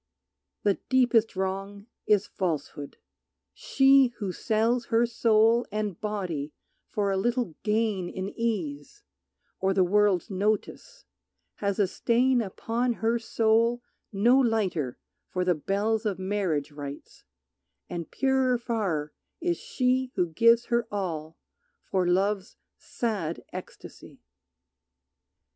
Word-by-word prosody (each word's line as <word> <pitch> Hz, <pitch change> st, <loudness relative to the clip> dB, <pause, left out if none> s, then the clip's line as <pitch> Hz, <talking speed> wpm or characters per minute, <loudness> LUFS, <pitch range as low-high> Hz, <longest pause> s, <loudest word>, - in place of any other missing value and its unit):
The 200 Hz, -2 st, +2 dB
deepest 240 Hz, -5 st, +3 dB
wrong 195 Hz, +2 st, -3 dB, 0.2 s
is 210 Hz, -1 st, +4 dB
falsehood. 155 Hz, -5 st, -4 dB, 0.6 s
She 270 Hz, -, +4 dB
who 200 Hz, -4 st, -3 dB
sells 230 Hz, +4 st, 0 dB
Her 230 Hz, +1 st, +3 dB
soul 230 Hz, 0 st, +3 dB
and 210 Hz, -4 st, -3 dB
body 180 Hz, -9 st, -3 dB, 0.4 s
for 200 Hz, -2 st, 0 dB
a 195 Hz, -, 0 dB
little 240 Hz, -2 st, 0 dB
gain 210 Hz, -4 st, 0 dB
In 190 Hz, 0 st, -4 dB
ease, 180 Hz, -12 st, -4 dB, 0.6 s
or 190 Hz, 0 st, +1 dB
the 190 Hz, -, +4 dB
world's 200 Hz, -1 st, +2 dB
notice, 215 Hz, -, -2 dB, 0.5 s
has 200 Hz, -1 st, -1 dB
a 205 Hz, -, +3 dB
stain 240 Hz, +6 st, +2 dB
Upon 230 Hz, +4 st, -1 dB
her 230 Hz, +1 st, 0 dB
soul 230 Hz, +1 st, +2 dB, 0.3 s
no 235 Hz, +6 st, +4 dB
lighter 195 Hz, -, 0 dB, 0.3 s
for 180 Hz, -1 st, -1 dB
the 180 Hz, -, +3 dB
bells 205 Hz, +7 st, -1 dB
Of 200 Hz, -, -2 dB
marriage 185 Hz, -7 st, -1 dB
rites, 145 Hz, -1 st, -9 dB, 0.6 s
and 170 Hz, -2 st, -5 dB
purer 265 Hz, -2 st, +2 dB
far 195 Hz, -11 st, -2 dB, 0.3 s
is 345 Hz, 0 st, -1 dB
she 255 Hz, 0 st, 0 dB
Who 180 Hz, -3 st, +1 dB
gives 230 Hz, +8 st, +4 dB
her 235 Hz, -1 st, +2 dB
all 165 Hz, -6 st, -4 dB, 0.5 s
for 185 Hz, -2 st, 0 dB
love's 195 Hz, +2 st, 0 dB, 0.2 s
sad 200 Hz, -9 st, -3 dB
ecstasy. -, -, -10 dB
210 Hz, 115 wpm, -27 LUFS, 185-235 Hz, 0.6 s, is